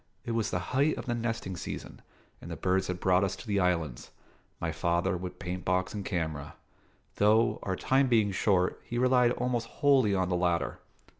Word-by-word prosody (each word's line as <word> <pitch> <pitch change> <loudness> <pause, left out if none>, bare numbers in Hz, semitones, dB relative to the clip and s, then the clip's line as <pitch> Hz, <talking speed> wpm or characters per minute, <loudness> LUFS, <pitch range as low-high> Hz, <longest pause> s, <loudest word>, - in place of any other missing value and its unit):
It - - -3
was 115 -1 0
the 90 - -1 0.2
height 140 +4 +2
of - - -6
the 120 - -1
nesting 115 -5 -3
season, - - -7 0.4
and - - -9
the - - -4
birds 95 0 0
had 90 -1 -3
brought 95 +1 +3
us 95 0 -1
to - - -11
the 100 -3 0
islands; 85 -9 -1 0.5
my 85 - -2
father 85 +3 0
with 90 0 -6
paint 90 -1 -5
box 95 0 0
and 105 -2 -4
camera 80 -7 -3 0.6
though, 110 +3 +3
our 95 - -2
time 135 +7 +2
being 110 -5 +3
short, 95 -1 +1
he 120 - -5
relied 125 -1 +4
almost 120 -2 -1
wholly 135 -9 +3
on 95 -1 +1
the 90 - +1
latter. 85 -1 0
95 Hz, 195 wpm, -29 LUFS, 90-115 Hz, 0.6 s, relied